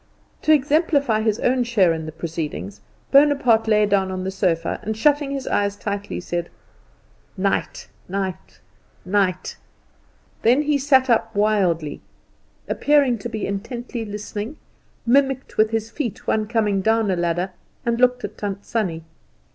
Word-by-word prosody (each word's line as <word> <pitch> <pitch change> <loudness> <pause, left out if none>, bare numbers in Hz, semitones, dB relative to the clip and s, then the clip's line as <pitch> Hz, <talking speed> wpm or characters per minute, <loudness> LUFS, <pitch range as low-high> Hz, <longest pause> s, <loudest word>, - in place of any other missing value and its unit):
To 310 - +2
exemplify 285 -5 +3
his 220 0 0
own 250 0 +2
share 205 -8 +3
in 160 -1 -5
the - - -5
proceedings, 150 - -5 0.3
Bonaparte 275 -6 +4
lay 210 -1 +4
down 195 -2 +1
on 185 0 -4
the 190 - -2
sofa, 170 -4 0
and 215 0 -4
shutting 290 +3 +2
his 275 -1 -4
eyes 200 0 +1
tightly, 205 0 -4
said, 175 -1 -4 0.9
"Night, 195 +1 -1 0.2
night, 190 -1 -4 0.4
night!" 185 -1 0 0.8
Then 250 +6 +4
he 295 -1 +1
sat 265 -1 +4
up 225 -2 +1
wildly, 185 -8 +1 0.7
appearing 280 -5 +2
to - - -5
be 215 - -3
intently 235 +4 -4
listening, 210 +5 -6 0.5
mimicked 265 +1 +1
with 215 0 +4
his 225 0 -2
feet 255 -8 -3
the 215 -1 +1
coming 210 -4 +1
down 220 0 +2
a - - +1
ladder, 175 +2 -1 0.3
and 235 0 0
looked 250 0 +3
at - - -6
Tant 200 -1 -4
Sannie. 180 -8 -2
215 Hz, 145 wpm, -22 LUFS, 190-250 Hz, 0.9 s, Bonaparte